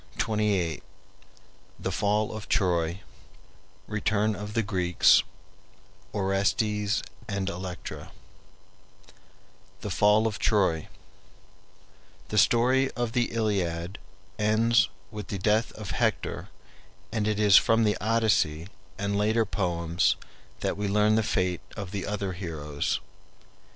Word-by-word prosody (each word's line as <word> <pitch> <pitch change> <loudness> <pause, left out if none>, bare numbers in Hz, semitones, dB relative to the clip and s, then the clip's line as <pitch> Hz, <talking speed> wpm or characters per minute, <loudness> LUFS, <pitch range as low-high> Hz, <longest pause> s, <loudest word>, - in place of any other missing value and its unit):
CHAPTER 110 - 0
XXVIII 95 -7 0 1.0
THE 95 - -3
FALL 105 +3 +1
OF 110 -1 -8
TROY 85 -1 +1 0.8
RETURN 105 0 0
OF 105 +2 -7
THE 115 - +2
GREEKS 90 -4 +4 0.9
ORESTES 105 +2 0 0.2
AND 100 -2 -2
ELECTRA 90 -2 -6 1.7
THE - - -4
FALL 105 +2 +4
OF 110 -2 -2
TROY 95 -7 +2 1.4
The 105 - +2
story 130 +5 +4
of 120 -2 -2
the 120 0 +2
Iliad 95 -5 -1 0.4
ends 110 +2 +3 0.2
with 105 -1 -7
the 100 - -4
death 105 +4 +1
of 105 -3 -7
Hector, - - -1 0.6
and 110 -2 -1
it 105 -1 0
is 105 -2 +7
from 115 0 +4
the 105 -1 +2
Odyssey 105 -7 +1 0.3
and 100 0 -1
later 110 +2 +2
poems 85 -4 0 0.5
that - - -1
we 105 0 -1
learn 105 +2 +3
the 110 - +3
fate 90 -4 0 0.2
of 100 -3 -5
the 100 -2 -4
other 100 -2 -2
heroes. 75 -5 -3
105 Hz, 115 wpm, -27 LUFS, 95-110 Hz, 1.7 s, is